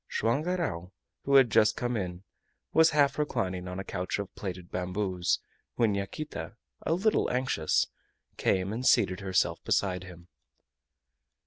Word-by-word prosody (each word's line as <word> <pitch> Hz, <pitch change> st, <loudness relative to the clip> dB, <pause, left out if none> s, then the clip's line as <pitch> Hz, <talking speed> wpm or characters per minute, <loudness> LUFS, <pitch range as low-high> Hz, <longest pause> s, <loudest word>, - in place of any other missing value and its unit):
Joam 120 Hz, +6 st, +1 dB
Garral, 155 Hz, -, -2 dB, 0.3 s
who 140 Hz, -, +3 dB
had 130 Hz, -4 st, +7 dB
just 110 Hz, 0 st, +4 dB
come 120 Hz, 0 st, -1 dB
in, 90 Hz, -3 st, -4 dB, 0.5 s
was 160 Hz, 0 st, +6 dB
half 145 Hz, -2 st, +2 dB
reclining 95 Hz, -11 st, -1 dB
on 90 Hz, 0 st, -5 dB
a -, -, -3 dB
couch 90 Hz, -1 st, -3 dB
of 100 Hz, -2 st, -5 dB
plaited 90 Hz, -3 st, -6 dB
bamboos, 90 Hz, -1 st, -1 dB, 0.4 s
when 115 Hz, -3 st, +2 dB
Yaquita, 100 Hz, +7 st, -5 dB, 0.3 s
a -, -, 0 dB
little 210 Hz, +5 st, +2 dB
anxious, 125 Hz, -11 st, +1 dB, 0.5 s
came 95 Hz, +1 st, +1 dB
and 120 Hz, +3 st, -3 dB
seated 100 Hz, -7 st, +3 dB
herself 90 Hz, -4 st, 0 dB
beside 90 Hz, -2 st, 0 dB
him. 90 Hz, -1 st, -12 dB
100 Hz, 140 wpm, -29 LUFS, 90-130 Hz, 0.5 s, had